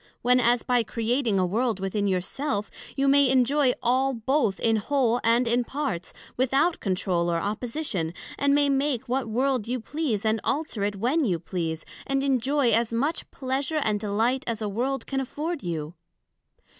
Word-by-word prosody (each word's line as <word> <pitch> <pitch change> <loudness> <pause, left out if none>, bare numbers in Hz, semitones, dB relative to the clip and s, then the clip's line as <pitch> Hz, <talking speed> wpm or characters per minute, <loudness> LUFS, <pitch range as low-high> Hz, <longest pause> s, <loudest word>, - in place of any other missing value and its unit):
when 250 +1 +4
as 240 -1 +3
by 245 -1 +2
creating 230 0 0
a 185 - +3
World 220 +3 0
within 200 +2 -1
your 185 -2 +1
self, 210 -1 -3 0.2
you 275 0 +1
may 280 -1 +5
enjoy 265 +1 +3
all 260 +2 +2
both 230 -3 0
in 225 -1 +2
whole 245 0 +1
and 235 +2 +3
in 240 +2 +2
parts, 235 - -3 0.2
without 270 +7 +2
controle 180 -3 0
or 170 - +1
opposition; 210 - -3 0.2
and 280 0 +2
may 290 0 +3
make 275 -3 0
what 255 -1 -1
World 250 0 0
you 250 +1 -1
please, 240 -4 -2
and 220 0 +1
alter 290 -8 -2
it 205 0 -1
when 255 +11 +1
you 185 -9 +1
please, 165 -2 -4 0.2
and 275 0 0
enjoy 270 -1 +2
as 230 0 +2
much 280 +8 -1
pleasure 275 +4 -2
and 210 -1 0
delight 225 +6 0
as 230 -2 -2
a 215 - -2
World 250 +7 -2
can 270 - -2
afford 305 +5 -4
you? 160 -2 -4
245 Hz, 175 wpm, -26 LUFS, 210-275 Hz, 0.2 s, may